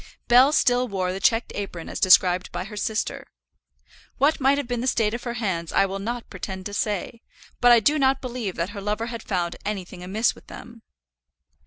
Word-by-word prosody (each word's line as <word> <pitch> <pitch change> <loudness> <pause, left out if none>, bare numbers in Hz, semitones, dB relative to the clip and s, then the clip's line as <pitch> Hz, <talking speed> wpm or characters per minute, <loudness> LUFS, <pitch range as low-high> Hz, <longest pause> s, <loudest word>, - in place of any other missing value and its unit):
Bell 250 +4 +6
still 250 -4 +2
wore 185 -4 -2
the 190 - -5
checked 225 +3 +1
apron 185 -5 -6
as - - -5
described 185 0 +4
by - - -4
her 210 +2 -9
sister. 215 +1 -3 0.9
What 290 +3 +2
might 275 +1 +3
have 285 -3 -3
been 245 -1 -2
the 255 - -2
state 225 -4 +1
of 240 - -5
her 240 -1 -3
hands 185 -8 -2
I - - +3
will 195 0 -4
not 235 +4 -4
pretend 190 -1 -6
to 205 - -6
say; 210 +2 -3 0.4
but 245 0 +6
I 240 - +8
do 300 +7 +2
not 270 0 +3
believe 240 -7 -5
that 170 +4 -3
her 205 -1 -7
lover 210 +3 -2
had 230 - -5
found 175 -5 -2
anything 190 -3 -5
amiss 210 +6 +1
with - - -19
them. 235 -1 -11
215 Hz, 205 wpm, -24 LUFS, 190-245 Hz, 0.9 s, I